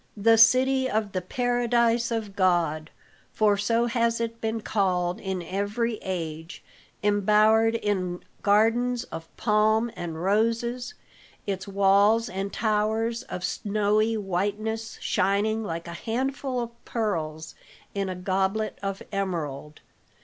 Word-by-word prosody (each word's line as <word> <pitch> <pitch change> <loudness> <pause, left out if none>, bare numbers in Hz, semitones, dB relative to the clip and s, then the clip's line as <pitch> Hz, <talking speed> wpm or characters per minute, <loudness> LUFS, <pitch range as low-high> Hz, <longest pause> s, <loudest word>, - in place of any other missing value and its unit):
"The 225 +3 +5
City 260 +3 +5
of 215 -2 -1
the 185 - -2
Paradise 235 +2 +1
of 220 -4 -3
God," 170 -5 +1 0.4
for 210 -2 +3
so 230 +4 +1
has 235 -1 +1
it 230 0 -4
been 225 0 -2
called 180 -4 0
in 190 -2 -3
every 205 +6 -2
age, 165 -3 -5 0.4
embowered 215 +2 +4
in 185 -5 -2 0.2
gardens 230 +4 +2
of 165 -7 -8
palm 220 +1 +2
and 165 -2 -5
roses, 230 +5 0 0.5
its 195 -1 -3
walls 200 +3 +3
and 195 +1 -4
towers 220 +2 0
of 180 - -7
snowy 215 +3 +1
whiteness 210 +3 -2
shining 215 +3 +1
like 170 -3 -5
"a 170 - -6
handful 260 +5 -2
of 235 0 -7
pearls 160 -8 -3 0.4
in 195 -1 -2
a 185 - -3
goblet 190 +3 -1
of 195 -1 -4
emerald." 155 -7 -4
210 Hz, 120 wpm, -26 LUFS, 190-230 Hz, 0.5 s, The